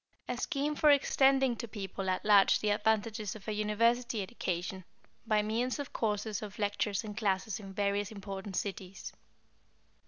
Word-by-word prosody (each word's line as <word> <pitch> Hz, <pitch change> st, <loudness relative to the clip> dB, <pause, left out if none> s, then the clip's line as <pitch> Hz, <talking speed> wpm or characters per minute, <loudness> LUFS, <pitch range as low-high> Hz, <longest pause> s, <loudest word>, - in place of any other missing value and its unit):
= -, -, -42 dB
A 250 Hz, -, -2 dB
scheme 285 Hz, +3 st, -1 dB
for 300 Hz, -, +4 dB
extending 270 Hz, -2 st, +4 dB
to 235 Hz, -, -5 dB
people 195 Hz, -2 st, -4 dB
at 185 Hz, -, -1 dB
large 205 Hz, -2 st, +6 dB
the 210 Hz, -, +1 dB
advantages 215 Hz, 0 st, 0 dB
of 215 Hz, -1 st, -12 dB
a -, -, -1 dB
university 225 Hz, +2 st, +1 dB
education, 185 Hz, -3 st, -4 dB, 0.4 s
by 215 Hz, -1 st, +3 dB
means 235 Hz, +4 st, -1 dB
of 285 Hz, -2 st, -6 dB
courses 210 Hz, -1 st, -1 dB
of 210 Hz, -1 st, -8 dB
lectures 205 Hz, 0 st, 0 dB
and 210 Hz, -1 st, -7 dB
classes 200 Hz, -1 st, 0 dB
in 195 Hz, -2 st, -9 dB
various 200 Hz, 0 st, 0 dB
important 195 Hz, -1 st, -6 dB
cities. 195 Hz, -1 st, -5 dB
210 Hz, 160 wpm, -32 LUFS, 200-230 Hz, 0.4 s, large